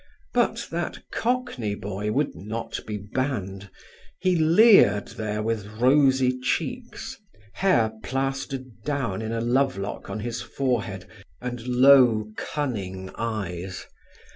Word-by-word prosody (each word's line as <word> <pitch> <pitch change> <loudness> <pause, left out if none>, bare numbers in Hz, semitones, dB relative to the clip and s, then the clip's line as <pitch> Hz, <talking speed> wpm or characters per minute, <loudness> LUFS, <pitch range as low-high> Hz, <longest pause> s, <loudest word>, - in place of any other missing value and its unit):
But - - +1
that - - -2
Cockney 235 - -1
boy 105 +1 -3
would 140 +5 0
not 110 +7 -5
be 105 -1 -3
banned; 100 -3 -3 0.5
he 185 -1 +2
leered 165 - +6
there 105 -1 -3
with 110 -2 -2
rosy 130 -1 +4
cheeks, 235 - -3 0.4
hair 120 - +3
plastered 135 -2 -3
down 130 -9 -2
in 110 0 -3
a 115 0 -1
love 130 0 +2
lock 100 +1 -5
on 110 - -4
his 120 +1 -3
forehead, 115 -8 -2 0.3
and 125 -1 -5
low 125 -4 +6
cunning 95 -10 -4
eyes. 95 -5 -4
120 Hz, 115 wpm, -25 LUFS, 105-135 Hz, 0.5 s, leered